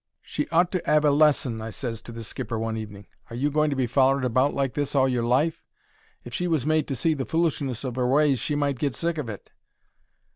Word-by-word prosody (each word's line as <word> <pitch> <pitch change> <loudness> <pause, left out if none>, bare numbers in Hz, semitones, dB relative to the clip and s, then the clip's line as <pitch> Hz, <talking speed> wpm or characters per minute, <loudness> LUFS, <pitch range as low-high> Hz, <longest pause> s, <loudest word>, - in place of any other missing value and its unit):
"She 150 - -4
ought 175 +2 +3
to 185 - -1
'ave 150 0 +4
a - - +5
lesson," 140 -6 +3
I 110 - -5
ses 115 0 -5
to 120 - -10
the 115 0 -7
skipper 115 +1 -4
one 110 0 -2
evening. 105 -2 -7 0.2
"Are 115 - -7
you 145 +5 0
going 150 +1 +2
to 140 - -1
be 130 -1 +1
follered 135 +2 +2
about 130 +4 +2
like 135 -2 0
this 145 0 -2
all 135 -1 +4
your 125 -2 0
life? 140 +8 +1 0.6
If 120 - -10
she 180 +7 -1
was 160 -7 0
made 155 0 +1
to 135 - -2
see 160 +6 +1
the 140 -3 -3
foolishness 140 -4 -1
of 130 -1 -4
'er 125 - +2
ways 140 0 +3
she 150 - -2
might 140 -3 0
get 140 -4 -1
sick 170 -1 -1
of 130 -6 -4
it." 105 - -9
135 Hz, 245 wpm, -25 LUFS, 120-150 Hz, 0.6 s, a